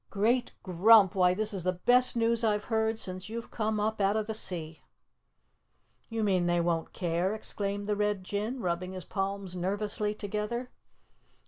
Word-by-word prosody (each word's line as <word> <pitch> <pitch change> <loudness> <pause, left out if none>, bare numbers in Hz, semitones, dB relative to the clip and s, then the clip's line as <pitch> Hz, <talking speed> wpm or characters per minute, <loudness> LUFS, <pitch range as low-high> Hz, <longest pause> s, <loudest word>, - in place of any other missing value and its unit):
"Great 235 +5 +1
Grump, 195 +2 +6
why 180 -2 +3
this 215 +2 0
is 195 - -2
the 185 +2 +1
best 245 +8 +3
news 230 0 +1
I've 210 -2 +1
heard 220 0 +1
since 185 -1 -5
you've 230 +1 -6
come 215 -1 -1
up 215 0 -1
out 195 +1 +2
of 215 -1 0
the 220 - -4
sea." 165 -7 -4 1.3
"You 225 -1 -2
mean 185 -4 +2
they 175 0 +2
won't 170 -1 -1
care?" 175 +3 -1
exclaimed 205 -1 -3
the 210 0 0
Red 205 -2 0
Jinn, 210 +7 -3
rubbing 180 0 -2
his 185 -2 -7
palms 195 -2 -3
nervously 205 +3 -1
together. 210 +4 -4
205 Hz, 165 wpm, -29 LUFS, 185-220 Hz, 1.3 s, Grump